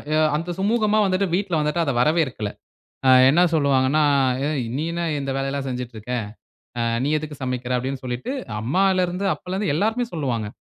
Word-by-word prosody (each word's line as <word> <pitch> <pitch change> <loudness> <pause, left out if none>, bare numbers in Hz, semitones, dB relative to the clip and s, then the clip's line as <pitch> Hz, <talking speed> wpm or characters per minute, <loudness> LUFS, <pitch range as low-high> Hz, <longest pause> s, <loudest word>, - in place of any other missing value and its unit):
அ - - +3 0.2
அந்த 170 +3 -3
சுமூகமா 215 +1 +2
வந்துட்டு 190 +1 +1
வீட்டுல 180 -4 0
வந்துட்டு 150 +3 0
அதை 140 - 0
வரவேற்கல. 130 -8 +1 0.6
ஆ - - +7 0.2
என்ன 160 +6 +4
சொல்வாங்கன்னா, 140 -1 +3 0.4
"ஏ - - +1 0.3
நீ 150 - -1
என்ன 170 0 -2 0.2
இந்த 135 -1 -3
வேலைலாம் 135 0 -2
செஞ்சுட்டு 125 -2 -5
இருக்க? 110 +4 -8 0.7
அ - - +1 0.2
நீ 145 - 0
எதுக்கு 150 -1 -7
சமைக்கிற? 125 -1 -3
அப்பிடின்னு" 130 +2 -3
சொல்லிட்டு, 125 - -4 0.3
அம்மால 185 - +2
இருந்து 180 +3 -4
அப்பல 180 - -7
இருந்து 195 -6 0
எல்லோருமே 220 +8 +1
சொல்வாங்க. 125 -9 -2
150 Hz, 170 wpm, -22 LUFS, 130-180 Hz, 0.7 s, ஆ